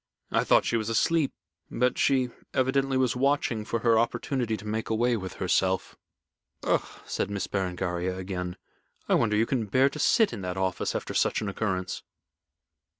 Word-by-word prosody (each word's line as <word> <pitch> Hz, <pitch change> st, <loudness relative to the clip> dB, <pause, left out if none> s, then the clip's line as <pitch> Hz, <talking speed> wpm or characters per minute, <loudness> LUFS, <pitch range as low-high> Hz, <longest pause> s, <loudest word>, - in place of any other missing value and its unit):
I -, -, +2 dB
thought -, -, +4 dB
she 120 Hz, -, +1 dB
was 110 Hz, -1 st, -2 dB
asleep, 150 Hz, +6 st, +2 dB, 0.4 s
but 125 Hz, +1 st, +1 dB
she 130 Hz, -3 st, +2 dB, 0.2 s
evidently 135 Hz, +1 st, +2 dB
was 130 Hz, -2 st, +2 dB
watching 130 Hz, -4 st, +1 dB
for 115 Hz, +1 st, -2 dB
her 115 Hz, -2 st, +4 dB
opportunity 120 Hz, 0 st, -1 dB
to 105 Hz, -, -11 dB
make 110 Hz, +1 st, -3 dB
away 120 Hz, +2 st, +2 dB
with 95 Hz, -4 st, -5 dB
herself." 95 Hz, 0 st, 0 dB, 0.7 s
"Ugh!" -, -, +2 dB, 0.2 s
said -, -, -2 dB
Miss 100 Hz, -2 st, -2 dB
Berengaria, 90 Hz, -1 st, -2 dB
again. 90 Hz, -1 st, -4 dB, 0.5 s
"I -, -, +2 dB
wonder 105 Hz, 0 st, +3 dB
you 110 Hz, -, +3 dB
can 115 Hz, -3 st, -1 dB
bear 130 Hz, +7 st, +4 dB
to 150 Hz, -, -7 dB
sit 220 Hz, +7 st, +4 dB
in -, -, -5 dB
that 90 Hz, 0 st, -4 dB
office 95 Hz, -1 st, -1 dB
after -, -, -3 dB
such -, -, +2 dB
an 105 Hz, -, -2 dB
occurrence." 95 Hz, -3 st, -2 dB
110 Hz, 170 wpm, -27 LUFS, 95-130 Hz, 0.7 s, thought